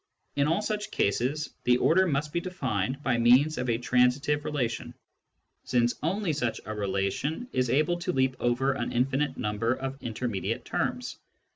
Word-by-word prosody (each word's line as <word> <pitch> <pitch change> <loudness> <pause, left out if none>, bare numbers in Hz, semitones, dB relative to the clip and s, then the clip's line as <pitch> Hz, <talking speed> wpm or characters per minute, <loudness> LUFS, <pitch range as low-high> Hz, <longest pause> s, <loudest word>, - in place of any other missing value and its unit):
In 140 0 +2
all 165 +7 +1
such 210 -1 -2
cases 130 +9 0
the 125 0 +4
order 185 +8 +4
must 150 -1 -1
be 170 - +1
defined 135 - -2
by 125 -3 +1
means 125 +6 +5
of 125 -1 -2
a 115 - +2
transitive 125 +4 +2
relation, 125 -6 -2 0.7
since 120 -1 +2
only 180 +2 0
such 120 -6 -1
a 110 - -4
relation 105 - -2
is 125 -1 +1
able 155 +7 +2
to 180 +1 -1
leap 130 -3 +1
over 120 +3 +1
an 120 -3 -3
infinite 135 +3 0
number 105 +3 0
of 135 +1 -5
intermediate 115 -4 -3
terms. - - -2
130 Hz, 160 wpm, -28 LUFS, 120-150 Hz, 0.7 s, means